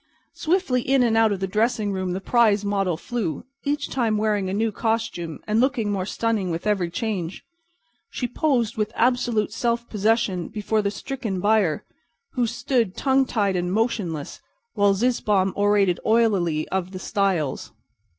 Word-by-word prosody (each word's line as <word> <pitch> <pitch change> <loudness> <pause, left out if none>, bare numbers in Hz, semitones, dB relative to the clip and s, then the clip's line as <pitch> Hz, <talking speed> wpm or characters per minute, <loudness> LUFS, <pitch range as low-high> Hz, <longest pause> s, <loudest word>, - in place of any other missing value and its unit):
Swiftly 320 -7 +1
in 265 +1 +3
and 230 -2 +2
out 225 -1 +4
of 195 -2 -2
the - - +1
dressing 215 +2 0
room 185 -2 -2
the 185 - -2
prize 210 -1 +3
model 195 -4 0
flew, 190 - -3 0.2
each 285 0 -1
time 230 -5 0
wearing 210 -3 0
a - - -2
new 220 +2 0
costume 220 -8 -2
and 215 +1 +1
looking 250 -5 +1
more 190 -2 -2
stunning 220 -4 -1
with 170 +2 -3
every 195 -5 +1
change. 185 -2 -3 0.7
She 245 - -3
posed 245 -4 0
with 215 0 -1
absolute 235 -3 +1
self 235 0 -1
possession 210 -4 +1
before 215 +1 -1
the 200 - 0
stricken 220 -2 -4
buyer, 205 -5 +2 0.5
who 245 -2 0
stood, 230 -4 -1
tongue 265 -1 +2
tied 200 -5 0
and 180 0 -1
motionless, 195 -8 -2 0.3
while 200 -1 +3
Zizzbaum 205 -4 +1
orated 200 -3 +2
oilily 195 -9 +2
of 190 0 -2
the - - -5
styles. 190 -9 -1
210 Hz, 160 wpm, -23 LUFS, 190-235 Hz, 0.7 s, out